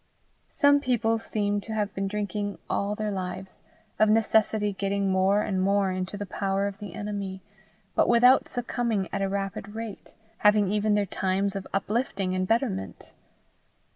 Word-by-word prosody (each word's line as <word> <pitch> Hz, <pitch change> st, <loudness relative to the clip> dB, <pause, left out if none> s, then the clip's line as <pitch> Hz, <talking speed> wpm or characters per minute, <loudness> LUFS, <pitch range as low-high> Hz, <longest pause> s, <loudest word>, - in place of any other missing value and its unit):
Some 285 Hz, -1 st, +4 dB
people 230 Hz, -4 st, +1 dB
seem 205 Hz, -2 st, -1 dB
to 220 Hz, -, -6 dB
have 210 Hz, -1 st, -1 dB
been 195 Hz, 0 st, -2 dB
drinking 205 Hz, 0 st, -3 dB
all 200 Hz, +1 st, -1 dB
their 215 Hz, 0 st, -2 dB
lives, 185 Hz, 0 st, -6 dB, 0.4 s
of 215 Hz, 0 st, +5 dB
necessity 215 Hz, -1 st, +2 dB
getting 195 Hz, 0 st, -1 dB
more 190 Hz, +2 st, +3 dB
and 190 Hz, -3 st, -1 dB
more 195 Hz, 0 st, +2 dB
into 185 Hz, +2 st, -3 dB
the 205 Hz, -, -4 dB
power 195 Hz, 0 st, -1 dB
of 200 Hz, 0 st, -4 dB
the 200 Hz, -5 st, -8 dB
enemy, 200 Hz, -2 st, -5 dB, 0.5 s
but -, -, +3 dB
without 250 Hz, +2 st, +6 dB
succumbing 235 Hz, -5 st, -1 dB
at -, -, -1 dB
a 195 Hz, -, 0 dB
rapid 200 Hz, +1 st, -4 dB
rate, 225 Hz, -2 st, -7 dB, 0.3 s
having 210 Hz, -2 st, +4 dB
even 210 Hz, 0 st, +2 dB
their 205 Hz, -1 st, +2 dB
times 195 Hz, +1 st, -1 dB
of 195 Hz, -1 st, -5 dB
uplifting 195 Hz, -2 st, -1 dB
and 185 Hz, 0 st, -1 dB
betterment. 95 Hz, -, -2 dB
205 Hz, 160 wpm, -27 LUFS, 195-215 Hz, 0.5 s, without